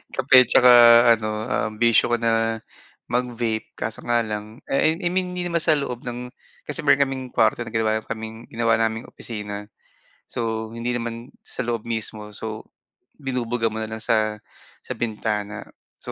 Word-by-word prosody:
Kape 130 Hz, 0 st, +5 dB
'tsaka 125 Hz, +1 st, +6 dB, 0.4 s
ano, 110 Hz, -1 st, -5 dB, 0.2 s
um, 110 Hz, -4 st, -1 dB
bisyo 120 Hz, 0 st, +4 dB
ko 120 Hz, -, +3 dB
na 115 Hz, -1 st, +1 dB, 0.5 s
mag-vape 120 Hz, -2 st, -2 dB
kaso 110 Hz, -, -4 dB
nga 120 Hz, 0 st, +2 dB
lang 105 Hz, +2 st, -6 dB
eh, 155 Hz, +4 st, +2 dB
ah, 180 Hz, -, -7 dB
I -, -, +4 dB
mean, 185 Hz, -1 st, 0 dB
hindi 180 Hz, 0 st, -3 dB
naman 170 Hz, -2 st, +1 dB
sa 155 Hz, -, +4 dB
loob 125 Hz, -4 st, -4 dB
ng 125 Hz, 0 st, -5 dB, 0.4 s
kasi 150 Hz, +2 st, -3 dB
meron 140 Hz, -1 st, +5 dB
kaming 130 Hz, -1 st, -5 dB
kuwarto -, -, +2 dB
na 115 Hz, -, -8 dB
ginawa 110 Hz, -1 st, 0 dB
kaming 110 Hz, +1 st, -7 dB
ginawa 115 Hz, 0 st, +2 dB
naming 115 Hz, 0 st, -1 dB
opisina, 105 Hz, -2 st, -6 dB, 0.6 s
so 110 Hz, -1 st, -3 dB
hindi 120 Hz, +1 st, -3 dB
naman 115 Hz, 0 st, -5 dB, 0.2 s
sa -, -, -5 dB
loob 115 Hz, -2 st, -2 dB
mismo 110 Hz, -2 st, -4 dB
so 110 Hz, +1 st, -6 dB, 0.6 s
binubuga 120 Hz, -4 st, -1 dB
mo 110 Hz, -, -4 dB
na 110 Hz, -, -4 dB
lang 110 Hz, 0 st, -5 dB
sa 110 Hz, -2 st, +1 dB, 0.4 s
sa -, -, -5 dB
bintana. 105 Hz, -2 st, -3 dB, 0.3 s
So, -, -, -7 dB
115 Hz, 170 wpm, -23 LUFS, 110-125 Hz, 0.6 s, tsaka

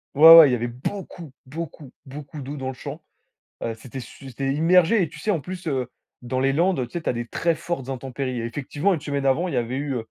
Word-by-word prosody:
Ouais, 160 Hz, +3 st, +11 dB
ouais! 160 Hz, -4 st, +10 dB
Il -, -, +1 dB
y -, -, +4 dB
avait 120 Hz, 0 st, -2 dB
beaucoup, 160 Hz, +5 st, -6 dB
beaucoup, 150 Hz, -1 st, -8 dB
beaucoup 145 Hz, +2 st, -9 dB
d'eau 140 Hz, +2 st, -6 dB
dans 130 Hz, -, -4 dB
le 130 Hz, -, -3 dB
champ. 140 Hz, +5 st, -8 dB, 0.6 s
Heu, 115 Hz, -, -2 dB
c'était 125 Hz, +3 st, -9 dB
su 135 Hz, +3 st, -11 dB
c'était 135 Hz, +2 st, -2 dB
immergé. 180 Hz, +7 st, +4 dB
Et 170 Hz, -, -1 dB
tu -, -, -13 dB
sais, 215 Hz, -, -2 dB
en 175 Hz, -6 st, +1 dB
plus, 180 Hz, +4 st, -8 dB
heu, 130 Hz, -5 st, -2 dB, 0.3 s
dans 125 Hz, +1 st, -3 dB
les 135 Hz, +1 st, +2 dB
Landes, 165 Hz, -3 st, +1 dB
tu -, -, -21 dB
sais, 175 Hz, -, -3 dB
tu -, -, -3 dB
as -, -, +2 dB
des 120 Hz, 0 st, -4 dB
très 165 Hz, +7 st, 0 dB
fortes 160 Hz, -5 st, -5 dB
intempéries. 130 Hz, -1 st, -4 dB
Et -, -, -4 dB
effectivement, 145 Hz, -, -1 dB
une 165 Hz, -, -1 dB
semaine 140 Hz, -1 st, -3 dB
avant, 140 Hz, +7 st, +2 dB
il -, -, -4 dB
y -, -, 0 dB
avait 120 Hz, +2 st, -1 dB
eu 140 Hz, -2 st, -3 dB
140 Hz, 255 wpm, -23 LUFS, 130-165 Hz, 0.6 s, Ouais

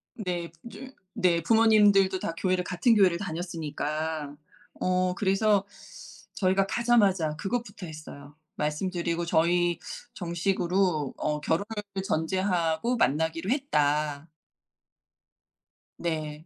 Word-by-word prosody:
네. 175 Hz, -6 st, -4 dB, 0.2 s
쫌 265 Hz, 0 st, -10 dB, 0.2 s
네 180 Hz, -5 st, +2 dB
부모님들도 205 Hz, -2 st, +4 dB
다 165 Hz, -, -3 dB
교회를 185 Hz, 0 st, 0 dB
같은 180 Hz, +6 st, +2 dB
교회를 185 Hz, -5 st, +4 dB
다녔으니까. 160 Hz, -4 st, -4 dB, 0.4 s
어 185 Hz, 0 st, +1 dB
그래서 200 Hz, +1 st, +2 dB, 0.7 s
저희가 190 Hz, 0 st, +2 dB
가자마자 195 Hz, -9 st, +2 dB
그것부터 200 Hz, +2 st, -4 dB
했어요. 150 Hz, -2 st, -11 dB, 0.2 s
말씀드리고 170 Hz, +2 st, -2 dB
"저희 175 Hz, +1 st, +2 dB, 0.3 s
정식으로 175 Hz, -3 st, 0 dB
어 150 Hz, 0 st, -2 dB
결혼을 160 Hz, +6 st, 0 dB, 0.4 s
전제하고 175 Hz, +4 st, 0 dB
만나기로 165 Hz, -, 0 dB
했다." 150 Hz, -, 0 dB, 1.7 s
네. 155 Hz, -2 st, -4 dB
175 Hz, 240 characters per minute, -27 LUFS, 160-195 Hz, 1.7 s, 부모님들도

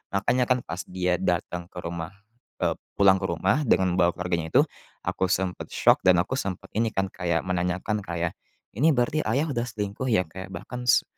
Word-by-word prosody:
Makanya, 125 Hz, +5 st, +2 dB
kan, 125 Hz, 0 st, +4 dB
pas 85 Hz, +2 st, -5 dB
dia 90 Hz, -1 st, 0 dB
datang 90 Hz, -1 st, -1 dB
ke 90 Hz, -, -16 dB
rumah, 85 Hz, +2 st, -5 dB, 0.5 s
eee, -, -, +2 dB, 0.2 s
pulang 95 Hz, -1 st, +5 dB
ke -, -, -1 dB
rumah 95 Hz, -, +1 dB
dengan 95 Hz, -4 st, +3 dB
membawa 85 Hz, -1 st, +3 dB
keluarganya 90 Hz, -3 st, -2 dB
itu, -, -, +8 dB, 0.4 s
aku 95 Hz, -, 0 dB
sempat 95 Hz, -1 st, -1 dB
syok -, -, +4 dB
dan 90 Hz, -1 st, +7 dB
aku 95 Hz, -, -5 dB
sempat 95 Hz, -7 st, -5 dB
ini, 115 Hz, +1 st, +1 dB
kan, 95 Hz, 0 st, 0 dB
kayak 85 Hz, -2 st, -1 dB
menanyakan 90 Hz, +3 st, -1 dB
ke 100 Hz, -, -11 dB
ayah, 85 Hz, 0 st, 0 dB, 0.4 s
"Ini 150 Hz, +8 st, +3 dB
berarti 125 Hz, +5 st, +1 dB
ayah 150 Hz, +3 st, +1 dB
udah 120 Hz, -3 st, -1 dB
selingkuh, 105 Hz, +2 st, -4 dB
ya? 110 Hz, -6 st, +3 dB
Kayak 95 Hz, +3 st, -8 dB
bahkan 125 Hz, 0 st, -7 dB
s -, -, +5 dB
95 Hz, 195 wpm, -26 LUFS, 90-110 Hz, 0.5 s, itu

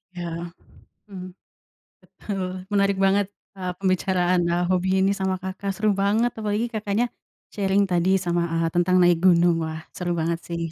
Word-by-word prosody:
Iya 175 Hz, -1 st, -5 dB, 0.8 s
hmm. 185 Hz, -3 st, -8 dB, 0.7 s
Betul, 195 Hz, -3 st, -5 dB, 0.3 s
menarik 200 Hz, -1 st, +2 dB
banget, 200 Hz, +1 st, +3 dB, 0.3 s
eee, 185 Hz, -1 st, -3 dB
pembicaraan, 185 Hz, -1 st, +1 dB
eee, 175 Hz, +1 st, +1 dB
hobi 185 Hz, 0 st, +1 dB
ini 195 Hz, +1 st, +3 dB
sama 190 Hz, 0 st, 0 dB
Kakak, 190 Hz, +1 st, -4 dB
seru 215 Hz, +1 st, +1 dB
banget. 205 Hz, +5 st, +2 dB
Apalagi 215 Hz, +1 st, -1 dB
Kakaknya 215 Hz, +2 st, 0 dB, 0.5 s
sharing 200 Hz, 0 st, +2 dB
tadi 175 Hz, +1 st, +2 dB, 0.2 s
sama, 175 Hz, 0 st, +1 dB
eee, 165 Hz, 0 st, +1 dB
tentang 175 Hz, +1 st, +3 dB
naik 175 Hz, -1 st, +5 dB
gunung. 175 Hz, -1 st, +5 dB
Wah 160 Hz, 0 st, -5 dB
seru 175 Hz, -1 st, -2 dB
banget 165 Hz, +1 st, -1 dB
sih. 170 Hz, -1 st, -3 dB
185 Hz, 150 wpm, -24 LUFS, 175-200 Hz, 0.8 s, naik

